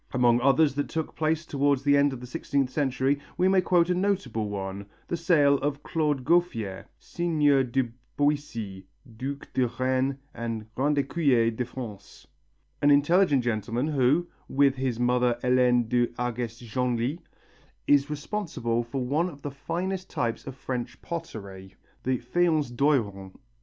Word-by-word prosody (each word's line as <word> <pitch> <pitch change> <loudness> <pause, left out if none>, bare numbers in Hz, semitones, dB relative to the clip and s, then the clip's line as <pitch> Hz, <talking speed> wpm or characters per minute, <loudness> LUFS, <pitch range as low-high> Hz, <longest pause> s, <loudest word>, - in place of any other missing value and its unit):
Among 120 -1 +4
others 140 +3 +4
that 145 +1 -2
took 160 -1 -3
place 160 +1 0
towards 140 -2 +1
the 145 0 +4
end 140 0 +4
of 130 - -6
the - - -7
sixteenth 135 -1 -1
century, 135 0 +1 0.2
we 185 - +3
may 190 0 +4
quote 175 -2 +3
a 180 - +2
notable 180 - -1
one, 100 0 -5 0.2
the - - -1
sale 150 -5 +3
of 145 0 -2
Claude 150 -5 -1
Gouffier 115 - +1
("Seigneir 150 -5 +2
de 125 0 -1 0.3
Boisy," 115 -10 -1 0.3
duc 140 +3 -6
de 130 -1 +2
Reannes 130 +3 0 0.2
and 115 -2 -4
Grand 145 +4 +1
Écuyer 135 -6 +2
de 125 - -1
France), 115 -5 -9 0.6
an 145 - +4
intelligent 145 0 +4
gentleman 120 +4 -1
who, 145 +4 +2 0.2
with 140 0 +4
his 130 -3 -2
mother 125 0 +2
Hélène 125 -2 +3
de 120 +1 +2
Hargest 120 -1 -3
Genlis, 125 +5 -1 0.7
is 145 0 +4
responsible 150 - -2
for 125 +2 -4
one 155 +8 +1
of 145 -4 -13
the 145 - -4
finest 180 +6 -4
types 115 +2 -2
of 135 - -6
French 125 -2 -5
pottery, 100 - -7 0.3
the 130 0 0
faience 155 +2 +1
d'Oiron. 110 -8 0
135 Hz, 150 wpm, -27 LUFS, 120-150 Hz, 0.7 s, Among